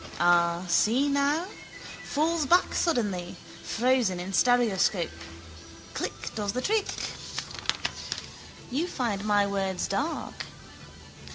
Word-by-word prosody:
Ah, 175 Hz, 0 st, +3 dB
see 230 Hz, +10 st, +3 dB
now! 285 Hz, +4 st, +2 dB, 0.6 s
Falls 310 Hz, 0 st, 0 dB
back 355 Hz, +4 st, +4 dB
suddenly, 205 Hz, -, 0 dB, 0.3 s
frozen 240 Hz, -6 st, +1 dB
in 185 Hz, +2 st, -5 dB
stereoscope. 215 Hz, -6 st, +3 dB, 0.8 s
Click -, -, -4 dB
does 205 Hz, -2 st, -2 dB
the 250 Hz, -, -1 dB
trick. 420 Hz, +9 st, +1 dB, 1.8 s
You 300 Hz, +8 st, 0 dB
find 225 Hz, -, -2 dB
my 205 Hz, -1 st, +3 dB
words 195 Hz, -2 st, -1 dB
dark. 290 Hz, +11 st, -2 dB
225 Hz, 95 wpm, -28 LUFS, 190-280 Hz, 1.8 s, back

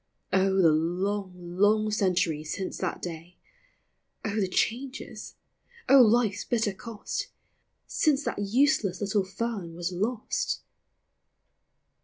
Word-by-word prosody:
O, 190 Hz, 0 st, +3 dB
the 165 Hz, -4 st, +6 dB
long, 185 Hz, +5 st, 0 dB, 0.3 s
long 215 Hz, +1 st, +4 dB
centuries 175 Hz, -7 st, 0 dB
since 190 Hz, -1 st, -4 dB
that 185 Hz, -, -3 dB
day! 170 Hz, +1 st, -7 dB, 0.9 s
O, 210 Hz, -, -1 dB
the 205 Hz, -3 st, +1 dB
changes! 255 Hz, +8 st, -3 dB, 0.5 s
O, 275 Hz, -1 st, +8 dB
life's 220 Hz, -3 st, +3 dB
bitter 220 Hz, -4 st, 0 dB
cost, 225 Hz, +2 st, -5 dB, 0.6 s
Since 295 Hz, -3 st, +1 dB
that -, -, -3 dB
useless 205 Hz, -, +2 dB
little 205 Hz, 0 st, +1 dB
fern 195 Hz, -3 st, -4 dB
was 175 Hz, +1 st, -3 dB
lost 215 Hz, +6 st, -1 dB
200 Hz, 110 wpm, -28 LUFS, 180-225 Hz, 0.9 s, O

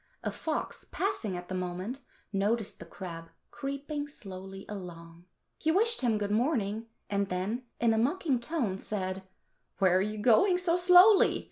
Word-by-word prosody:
A -, -, -1 dB
fox 315 Hz, -1 st, -3 dB
passing 300 Hz, -, -2 dB
at 175 Hz, 0 st, -8 dB
the -, -, -5 dB
moment 185 Hz, +7 st, -3 dB, 0.3 s
noticed 205 Hz, +2 st, 0 dB
the 170 Hz, -, -10 dB
crab 165 Hz, -2 st, -8 dB, 0.2 s
creeping 290 Hz, +2 st, -4 dB
slowly 195 Hz, -7 st, -9 dB
along. 170 Hz, -4 st, -9 dB, 0.3 s
He 315 Hz, -, +2 dB
wished 455 Hz, +6 st, +3 dB
him 235 Hz, -4 st, +2 dB
good 205 Hz, -1 st, -2 dB
morning, 225 Hz, -2 st, 0 dB, 0.2 s
and 200 Hz, -1 st, -1 dB
then 200 Hz, +8 st, -2 dB
in 230 Hz, -1 st, +3 dB
a 220 Hz, -, +2 dB
mocking 280 Hz, +1 st, +1 dB
tone 235 Hz, -, -2 dB
said, 190 Hz, -3 st, -3 dB, 0.6 s
"Where 185 Hz, -2 st, +4 dB
are 185 Hz, -, +4 dB
you 210 Hz, +2 st, -2 dB
going 255 Hz, -, +4 dB
so 355 Hz, -2 st, +2 dB
slowly? 360 Hz, +3 st, +7 dB
215 Hz, 155 wpm, -30 LUFS, 190-290 Hz, 0.6 s, slowly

